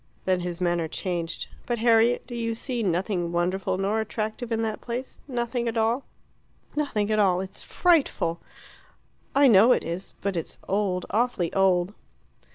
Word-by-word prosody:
Then 185 -1 +2
his 175 0 -4
manner 175 -2 +1
changed. 170 0 -3 0.2
"But, 240 - 0
Harriet, 230 +1 +4
do 245 - -9
you 230 -1 -2
see 245 +1 -3
nothing 180 -2 0
wonderful 185 +2 0
or 215 +3 +1
attractive 220 +2 -4
in 225 0 +1
that 220 -1 -3
place 245 +2 -5
nothing 240 -2 -2
at 230 0 -2
all?" 230 +4 +1 0.7
"Nothing 220 -9 0
at 215 - +2
all. 185 -3 +4
It's 190 0 -6
frightful." 290 - +2 1.0
"I 280 0 +6
know 225 +2 +7
it - - 0
is. 170 +4 -5
But 200 -1 -1
it's 165 - -4
old 195 -2 0
awfully 215 -5 0
old." 190 -1 +3
210 Hz, 160 wpm, -26 LUFS, 180-235 Hz, 1.0 s, know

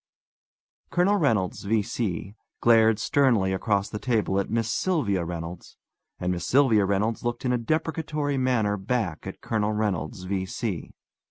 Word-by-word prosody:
Colonel 190 +4 +3
Reynolds, 110 - +1
V.C., 105 -3 -1 0.3
glared 110 -2 +5
sternly 115 -10 +2
across 100 +1 0
the 105 - -6
table 110 -6 +1
at 100 - -2
Miss 115 0 0
Sylvia 110 - 0
Reynolds, 85 0 -7 0.4
and 90 - -1
Miss 85 -1 -3
Sylvia 120 -7 +4
Reynolds 105 +3 0
looked 120 +1 -3
in 125 - +2
a - - +2
deprecatory 150 +1 -1
manner 115 -5 +1
back 100 -4 -2
at - - -8
Colonel 110 -1 0
Reynolds, 95 -5 -2
V.C. 95 0 -3
110 Hz, 140 wpm, -26 LUFS, 95-125 Hz, 0.4 s, glared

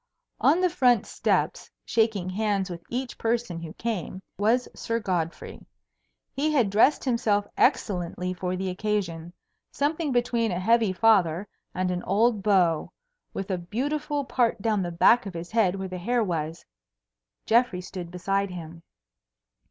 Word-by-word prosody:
On 345 - +4
the 365 - +3
front 250 - +3
steps, - - -1 0.2
shaking 220 -5 +1
hands 200 -2 -1
with 170 -1 -7
each 250 +1 -4
person 225 -7 -1
who 165 -1 -7
came, 205 -5 -4 0.2
was 225 +5 +2
Sir 230 0 -2
Godfrey. 175 -6 -3 0.7
He 300 +3 0
had 245 -10 +2
dressed 225 +8 +4
himself 220 -5 +1
excellently 180 - 0
for 180 0 -3
the 190 +1 -2
occasion; 180 -4 -2 0.4
something 300 +1 -1
between 240 -2 +1
a 175 - -2
heavy 225 +1 +3
father 190 -3 +3 0.3
and 185 0 0
an 180 0 -2
old 215 +3 +2
beau, 185 -6 +2 0.4
with 195 0 -5
a 185 - -1
beautiful 285 - -2
part 240 -4 +1
down 210 -1 +1
the 175 -1 -3
back 210 +7 +4
of 185 - -8
his 170 +1 -6
head 215 -5 +2
where 190 -1 -4
the 185 -1 -6
hair 235 +5 +1
was. 165 -4 -3 0.8
Geoffrey 230 -5 +2
stood 180 -1 -7
beside 195 +3 -1
him. 165 -2 -8
200 Hz, 150 wpm, -26 LUFS, 180-235 Hz, 0.8 s, On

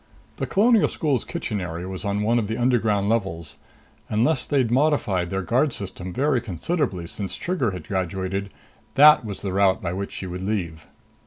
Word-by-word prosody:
The - - -2
Colonial 225 +2 +4
School's 140 -7 0
kitchen 105 -3 -4
area 90 0 -5
was 95 0 -6
on 100 0 -1
one 115 +3 +3
of 105 - -2
the 110 - -3
underground 110 -5 +2
levels. 95 -8 -2 0.5
Unless 120 +5 +1
they'd 130 -6 +1
modified 120 - +2
their 95 +1 -2
guard 130 - +1
system 95 -2 -6
very 135 +3 +1
considerably 110 - -2
since 95 +3 -3
Trigger 170 -10 -1
had 90 -2 -7
graduated, 95 0 -2 0.5
that 150 -1 +8
was 105 -3 -6
the 95 -2 -2
route 95 -1 +3
by 85 -1 -3
which 100 +1 -4
she - - -6
would 90 0 -5
leave. 90 -6 -3
100 Hz, 175 wpm, -24 LUFS, 95-125 Hz, 0.5 s, that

